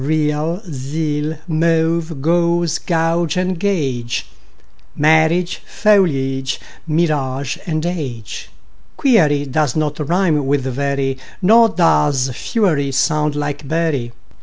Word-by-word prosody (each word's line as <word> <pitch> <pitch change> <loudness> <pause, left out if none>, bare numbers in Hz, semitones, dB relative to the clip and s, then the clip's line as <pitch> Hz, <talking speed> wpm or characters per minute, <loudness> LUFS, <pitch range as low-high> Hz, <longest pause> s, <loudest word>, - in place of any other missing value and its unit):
Real, 155 +5 0
zeal; 150 +1 -3
mauve, 165 -2 0
gauze 170 0 +1
and 170 +2 0
gauge; 135 -12 -1 0.7
Marriage, 160 +3 +3
foliage, 135 -11 +1 0.3
mirage, 140 -5 -1 0.3
age. 130 -11 -5 0.5
Query 155 - +3
does 145 -1 0
not 150 -1 -1
rime 155 -2 +1
with 140 0 +2
very, 135 0 -2 0.2
Nor 225 +4 +6
does 145 -8 +2
fury 155 - 0
sound 150 +2 +1
like 145 -1 -4
bury. 155 -6 -1
155 Hz, 90 wpm, -18 LUFS, 140-170 Hz, 0.7 s, Nor